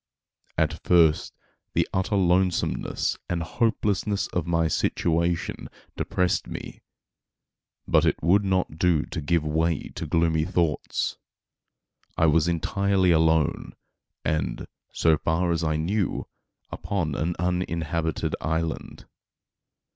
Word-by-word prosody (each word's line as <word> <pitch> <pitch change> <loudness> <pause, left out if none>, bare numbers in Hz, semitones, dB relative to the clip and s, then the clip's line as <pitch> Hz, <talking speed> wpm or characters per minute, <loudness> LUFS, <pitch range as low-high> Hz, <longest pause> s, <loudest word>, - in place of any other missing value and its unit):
At 80 0 0
first 80 -3 +4 0.4
the - - +2
utter 95 +3 0
lonesomeness 90 -1 +1
and 85 -1 -1
hopelessness 105 0 0
of 90 -3 -2
my 85 -1 +2
situation 85 +1 0 0.3
depressed 90 -1 0
me; - - -8 1.1
but - - +4
it - - +3
would 95 +5 +4
not 95 -5 -1
do 85 -4 +3
to 80 - -5
give 85 +2 +1
way 80 +1 0
to - - -6
gloomy 80 -2 +2
thoughts. 85 -3 -1 1.0
I 80 - +4
was 80 +1 +3
entirely 95 +2 +1
alone, 80 -1 +2 0.5
and, 75 -6 -1 0.2
so 80 -2 +2
far 85 +2 0
as 85 0 0
I 80 -1 +1
knew, 95 +6 -1 0.5
upon 85 -7 -2
an 85 +5 -1
uninhabited 85 -2 -1
island. 80 0 -3
85 Hz, 110 wpm, -25 LUFS, 80-90 Hz, 1.1 s, first